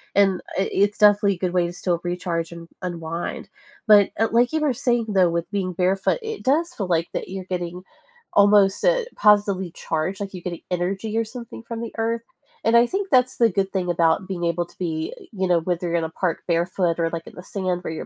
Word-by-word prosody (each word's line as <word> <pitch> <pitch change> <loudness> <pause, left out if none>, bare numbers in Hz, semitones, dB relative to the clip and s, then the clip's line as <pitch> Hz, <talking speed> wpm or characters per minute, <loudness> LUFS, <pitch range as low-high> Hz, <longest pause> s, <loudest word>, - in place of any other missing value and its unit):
And 195 -2 +3 0.2
i 195 - +1
it's 205 +1 +2
definitely 205 -1 +5
a - - -13
good 180 -1 -1
way 180 -1 +2
to 170 - -7
still 175 -1 -1
recharge 175 -2 -2
and 170 0 -10 0.2
unwind. 170 -1 -4 0.4
But 205 -2 +6
it 225 0 +1
like 240 +4 +3
you 315 - +2
were 295 -4 +2
saying 240 -2 0
though 190 -4 +4
with 170 0 -2
being 190 -3 -2
barefoot, 190 - +1
i - - -8
it 445 -1 -5
does 325 +6 +1
feel 195 - -3
like 170 -1 +1
that - - -4
you're 190 0 -6
getting 180 -1 -4 0.5
almost, 200 -1 +5
uh, - - +3
positively 200 -4 +3
charged, 165 +4 -3
like 200 -1 -4
you're 180 -2 -8
getting 175 -2 -5
energy 195 +5 -2
or 230 - +1
something 235 0 -9
from 230 0 -6
the 230 - -6
earth. 230 +1 0 0.4
And 230 - +3
I 235 - +6
think 390 +9 -3
that's 255 -4 +3
the 230 -1 +5
good 195 0 -1
thing 185 -2 -1
about 170 +2 +2
being 180 -3 -4
able 170 +1 0
to - - -22
be, 160 -3 -3 0.2
you 190 -3 -1
know, 175 -1 +3
whether 175 +1 -2
you're 170 - -3
going 170 - +1
to - - -1
the - - -25
park 180 -3 0
barefoot 170 0 0
or, 165 0 +1
like, 165 -1 -5
in - - -11
the - - -8
sand 185 -3 -3
where 160 - -4
you're - - -6
190 Hz, 235 wpm, -23 LUFS, 175-215 Hz, 0.5 s, But